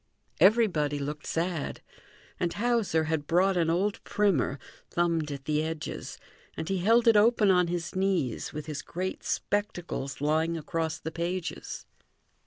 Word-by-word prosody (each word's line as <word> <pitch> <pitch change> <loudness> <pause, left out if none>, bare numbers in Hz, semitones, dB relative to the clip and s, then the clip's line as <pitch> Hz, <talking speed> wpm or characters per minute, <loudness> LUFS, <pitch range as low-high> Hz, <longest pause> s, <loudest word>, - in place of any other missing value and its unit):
Everybody 180 -7 +4
looked 145 +2 -5
sad; 165 -2 -2 0.6
and 170 -1 0
Hauser 225 -8 +1
had 155 -2 -2
brought 185 +3 +3
an 170 -2 +2
old 195 +5 0
primer, 185 -10 +1 0.3
thumbed 165 -3 0
at 140 -2 -6
the 150 +1 +1
edges, 160 0 -5 0.4
and 160 - -4
he 195 -1 0
held 230 +6 +4
it 225 - +7
open 210 -1 +5
on 180 -1 +4
his 175 +1 -3
knees 185 - 0
with 150 0 -6
his 155 -2 -4
great 185 +2 -4
spectacles 175 -9 -2
lying 160 +3 +1
across 160 0 -2
the 160 - -6
pages. 170 +2 -4
170 Hz, 145 wpm, -28 LUFS, 155-195 Hz, 0.6 s, it